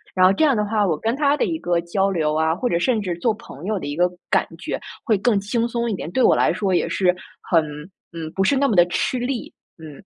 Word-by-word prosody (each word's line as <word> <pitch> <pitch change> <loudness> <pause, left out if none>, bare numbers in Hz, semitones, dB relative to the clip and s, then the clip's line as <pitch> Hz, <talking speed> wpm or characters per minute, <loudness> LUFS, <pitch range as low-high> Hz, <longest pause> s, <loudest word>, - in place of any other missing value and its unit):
然 185 -1 +5
后 190 - +4
这 315 - +1
样 275 -7 +3
的 210 - +1
话， 210 -1 +1
我 160 -5 0
跟 225 +2 -1
他 290 0 +2
的 - - +1
一 325 - -2
个 175 -1 0
交 190 +3 0
流 155 -4 0
啊， 160 0 +2
或 245 - -2
者 170 - +1
甚 230 +3 +1
至 180 -4 -3
做 225 - +2
朋 170 -8 -12
友 210 0 -1
的 - - -7
一 145 - -4
个 180 +1 +2 0.2
感 - - +3
觉 - - -4 0.3
会 225 - +3
更 215 -2 +2
轻 230 +4 -1
松 235 0 -2
一 220 - -1
点， 170 - -6
对 260 - 0
我 - - +5
来 - - +3
说 200 -3 -1
也 - - 0
是， 180 -2 +2 0.3
很 165 -3 +2 0.5
嗯， 165 -2 -6
不 195 - +2
是 275 +7 +2
那 280 0 +3
么 220 - 0
地 175 -1 +6
吃 250 +7 -1
力， 245 0 -4 0.2
嗯。 155 -2 -12
200 Hz, 290 characters per minute, -22 LUFS, 175-235 Hz, 0.5 s, 地